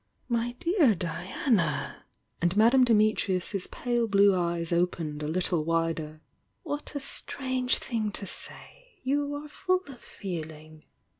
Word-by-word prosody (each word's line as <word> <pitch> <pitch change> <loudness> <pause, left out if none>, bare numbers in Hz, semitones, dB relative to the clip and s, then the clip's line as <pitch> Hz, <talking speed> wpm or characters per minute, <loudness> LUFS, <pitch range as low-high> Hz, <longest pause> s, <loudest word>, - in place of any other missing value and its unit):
"My 235 0 0
dear 315 - +3
Diana!" 170 - -1 0.4
And 175 +3 +1
Madame 235 +4 +6
Dimitrius's 210 -4 +2
pale 240 -2 -1
blue 200 -1 +5
eyes 170 -1 -1
opened 170 -3 0
a 150 - -2
little 175 0 +1
wider. 165 -1 -1 0.4
"What 295 -2 -5
a - - 0
strange 260 -2 0
thing 220 -4 -2
to 200 - -4
say! - - -10
You 285 +2 0
are 295 +1 -6
full 370 +4 0
of 255 -3 -10
feeling!" 155 -6 -8
205 Hz, 130 wpm, -28 LUFS, 170-260 Hz, 0.4 s, Madame